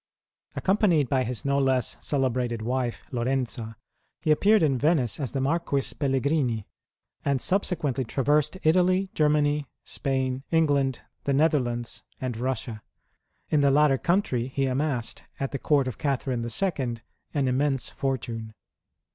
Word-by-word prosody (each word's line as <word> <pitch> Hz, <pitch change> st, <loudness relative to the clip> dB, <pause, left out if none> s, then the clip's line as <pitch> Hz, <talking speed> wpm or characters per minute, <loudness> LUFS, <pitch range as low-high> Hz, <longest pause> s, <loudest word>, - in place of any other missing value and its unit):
Accompanied 185 Hz, -, +2 dB
by 130 Hz, -2 st, +2 dB
his 125 Hz, 0 st, -4 dB
no 140 Hz, 0 st, +2 dB
less 130 Hz, -3 st, +1 dB
celebrated 125 Hz, -4 st, -1 dB
wife, 125 Hz, 0 st, -2 dB
Lorenza, 120 Hz, -3 st, -2 dB, 0.5 s
he 155 Hz, -, +3 dB
appeared 205 Hz, +6 st, +4 dB
in 135 Hz, -5 st, +2 dB
Venice 145 Hz, -5 st, +2 dB
as 135 Hz, -5 st, -2 dB
the 135 Hz, -, -2 dB
Marquis 140 Hz, 0 st, 0 dB
Pelligrini, 135 Hz, -5 st, 0 dB, 0.6 s
and 140 Hz, -2 st, +1 dB
subsequently 155 Hz, -7 st, 0 dB
traversed 145 Hz, +7 st, +1 dB
Italy, 185 Hz, +3 st, +3 dB
Germany, 150 Hz, -1 st, +2 dB, 0.2 s
Spain, 130 Hz, -1 st, -1 dB
England, 145 Hz, -5 st, +2 dB, 0.2 s
the 140 Hz, -, +1 dB
Netherlands, 125 Hz, -6 st, +1 dB, 0.2 s
and 130 Hz, -1 st, -2 dB
Eussia. 115 Hz, -2 st, -3 dB, 0.7 s
In 150 Hz, -, +4 dB
the 140 Hz, -, +4 dB
latter 140 Hz, -1 st, +4 dB
country 170 Hz, -10 st, +1 dB
he 135 Hz, +1 st, -1 dB
amassed, 130 Hz, -2 st, -1 dB, 0.2 s
at 135 Hz, -, -2 dB
the 140 Hz, -, -3 dB
Court 140 Hz, -2 st, +2 dB
of 125 Hz, -, -5 dB
Catherine 135 Hz, -3 st, -1 dB
II., 125 Hz, -, -1 dB, 0.4 s
an 140 Hz, -2 st, +2 dB
immense 135 Hz, 0 st, 0 dB
fortune. 115 Hz, -5 st, -3 dB
135 Hz, 130 wpm, -26 LUFS, 125-150 Hz, 0.7 s, appeared